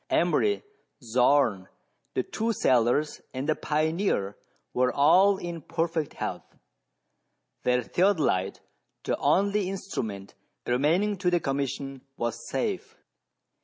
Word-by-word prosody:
Emery, 415 -1 +2 0.4
Zorn, 120 -5 +2 0.5
the 130 - +1
two 225 - -2
sailors, 125 - +2
and 130 +3 -3
the 155 - +3
pioneer, 155 - 0 0.4
were 125 0 +2
all 180 +9 +5
in 170 -3 -6
perfect 165 0 -2
health. - - -5 1.1
Their 125 0 +2
theodolite, 155 - +1 0.4
the - - 0
only 200 0 +2
instrument 110 - -5 0.3
remaining 165 +12 +2
to 180 -1 +1
the 175 -1 +2
Commission, 135 -2 -3 0.2
was 120 -1 -3
safe. - - -3
150 Hz, 105 wpm, -27 LUFS, 125-185 Hz, 1.1 s, all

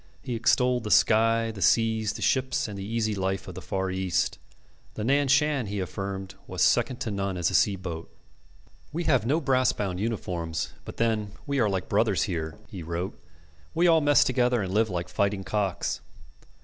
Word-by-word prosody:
He 125 - -4
extolled 125 +1 +2
the 105 - -4
sky, 115 +1 +4
the 105 -3 -9
seas, 110 0 +2
the - - -5
ships, 130 -2 +1
and 105 - -6
the 95 - -5
easy 110 +1 -1
life 95 -2 -2
of - - -7
the - - -8
Far 95 -1 -2
East. 95 -1 -1 0.6
The 105 - -4
Nan 140 +4 +2
Shan, 140 -2 +2
he 100 0 -3
affirmed, 95 +1 -4
was - - 0
second 125 - +2
to 110 - -2
none 100 -2 -2
as 85 -1 +1
a - - -6
sea 100 - +4
boat. 85 -3 -6 0.8
"We 170 +4 -2
have 130 -8 +2
no 150 +5 +2
brass 130 -4 +2
bound 95 -3 -3
uniforms, 85 -7 -3
but - - -9
then 110 -3 0
we 140 -1 -1
are 110 -4 +3
like 95 -2 -2
brothers 105 -4 +2
here," 80 -7 -3
he 95 - -8
wrote. 85 +3 -4 0.6
"We 170 +2 +3
all 165 -2 +5
mess 145 -1 +5
together 125 -3 +1
and 95 0 -4
live 110 +1 +2
like 90 -2 -3
fighting 100 +2 0
cocks. 100 -3 -1
105 Hz, 190 wpm, -27 LUFS, 95-120 Hz, 0.8 s, all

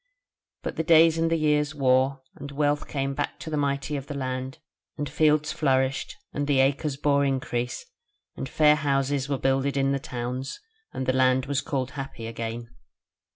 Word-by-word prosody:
But - - -4
the 160 - 0
days 165 0 +6
and 165 0 +2
the 165 - +2
years 150 -1 +1
wore, 130 0 +2
and 140 0 -8
wealth 145 +1 0
came 135 -1 -2
back 145 +1 -3
to 160 - -6
the - - 0
mighty 140 0 -1
of 140 0 -5
the 145 - -5
land, 130 -1 -4 0.4
and 145 -1 -2
fields 150 +1 +2
flourished 135 -2 0 0.2
and 145 0 -2
the 140 -2 +3
acres 135 +1 +1
bore 140 0 +2
increase, 125 -3 -2 0.5
and 135 - -5
fair 150 +1 +5
houses 140 -1 0
were 140 - 0
builded 135 +1 +1
in 135 0 +2
the 140 - 0
towns; 125 +1 -5 0.3
and 130 - -4
the 130 - +2
land 130 0 +3
was 140 0 0
called 130 -3 -2
happy 135 -5 -6
again. 115 +1 -6
140 Hz, 180 wpm, -26 LUFS, 130-145 Hz, 0.5 s, days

